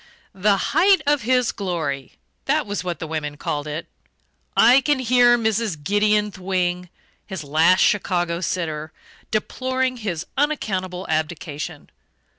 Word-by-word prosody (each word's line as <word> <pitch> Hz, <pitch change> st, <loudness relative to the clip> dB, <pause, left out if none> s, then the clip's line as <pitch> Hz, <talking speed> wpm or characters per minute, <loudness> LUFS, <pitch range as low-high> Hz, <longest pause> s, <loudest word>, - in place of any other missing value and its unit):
"The 200 Hz, +1 st, +2 dB
height 370 Hz, -, +3 dB
of 290 Hz, -1 st, +2 dB
his 250 Hz, +1 st, +2 dB
glory" 160 Hz, -9 st, -3 dB, 0.3 s
that 300 Hz, +1 st, +1 dB
was 205 Hz, -3 st, -3 dB
what 175 Hz, -2 st, -3 dB
the 160 Hz, -, -5 dB
women 150 Hz, -2 st, -4 dB
called 145 Hz, 0 st, -3 dB
it. 150 Hz, +2 st, -4 dB, 0.7 s
I 250 Hz, +4 st, +7 dB
can 295 Hz, +1 st, +2 dB
hear 245 Hz, -1 st, +4 dB
Mrs. 220 Hz, -8 st, -1 dB
Gideon 210 Hz, +3 st, +2 dB
Thwing 180 Hz, -2 st, -2 dB, 0.4 s
his 190 Hz, -6 st, -6 dB
last 160 Hz, +6 st, +4 dB
Chicago 175 Hz, -4 st, +1 dB
sitter 155 Hz, -4 st, -3 dB, 0.4 s
deploring 255 Hz, +4 st, -1 dB
his 180 Hz, -7 st, -4 dB
unaccountable 195 Hz, -11 st, -1 dB
abdication. 155 Hz, -1 st, -4 dB
190 Hz, 125 wpm, -22 LUFS, 160-240 Hz, 0.7 s, I